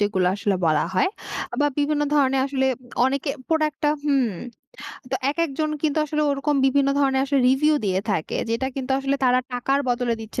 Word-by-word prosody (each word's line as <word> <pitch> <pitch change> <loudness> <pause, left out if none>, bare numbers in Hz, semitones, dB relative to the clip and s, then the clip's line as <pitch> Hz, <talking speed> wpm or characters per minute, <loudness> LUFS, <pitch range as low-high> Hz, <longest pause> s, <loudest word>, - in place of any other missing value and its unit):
যেগুলা 190 -3 +1
আসলে 200 -1 0
বলা 155 -1 +2
হয় 185 - +2 0.4
আ - - -3
বা 290 - +4
বিভিন্ন 295 0 +1
ধরনের 270 -2 +3
আসলে 265 -1 0 0.4
অনেকে 275 +2 -1 0.2
প্রোডাক্টটা 305 -2 +1
হুম 275 -5 +2 0.8
তো - - 0 0.2
একেকজন 310 -1 -1
কিন্তু 310 -1 +1
আসলে 300 +1 -1
ওরকম 280 +1 0
বিভিন্ন 275 +1 +2
ধরণের 270 -2 +2
আসলে 275 -1 +1
রিভিউ 300 +4 +3
দিয়ে 190 -1 +1
থাকে 160 -6 -2
যেটা 230 +3 0
কিন্তু 265 -1 -4
আসলে 275 +1 0
তারা 250 0 +4
টাকার 270 +3 0
বদলে 245 -1 0
দিচ্ছে 220 +2 -6
270 Hz, 175 wpm, -23 LUFS, 245-290 Hz, 0.8 s, বা